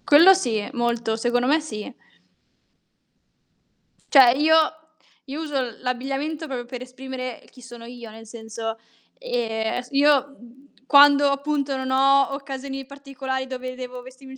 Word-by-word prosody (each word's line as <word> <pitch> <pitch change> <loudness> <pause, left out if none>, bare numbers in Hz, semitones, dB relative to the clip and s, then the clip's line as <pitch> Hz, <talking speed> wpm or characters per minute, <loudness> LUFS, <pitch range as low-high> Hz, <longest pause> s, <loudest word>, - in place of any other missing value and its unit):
Quello 330 +6 +8
sì, 225 - -1
molto. 235 -2 -1
Secondo 240 +2 0
me 305 +4 +3
sì. 245 -5 -7 2.2
Cioè, 265 -4 +8
io 315 +2 +5 0.7
io 285 +3 -6
uso 270 -7 -3
l'abbigliamento 270 +5 -3
proprio 250 -3 -5
per 250 0 -8
esprimere 255 -1 -7
chi 255 - -17
sono 240 -1 -11
io, 240 -1 -10
nel 225 +1 -13
senso, 225 0 -6 0.4
ehm, 225 - -2
aes 250 0 -5
io 280 0 +3 0.5
quando 285 0 +6
appunto 280 0 -1
non 260 0 -4
ho 275 +1 +4
occasioni 270 -1 -6
particolari 270 -1 -5
dove 255 -1 -6
devo 250 -1 -8
vestirmi 260 +1 -13
in - - -11
260 Hz, 135 wpm, -23 LUFS, 240-280 Hz, 2.2 s, Quello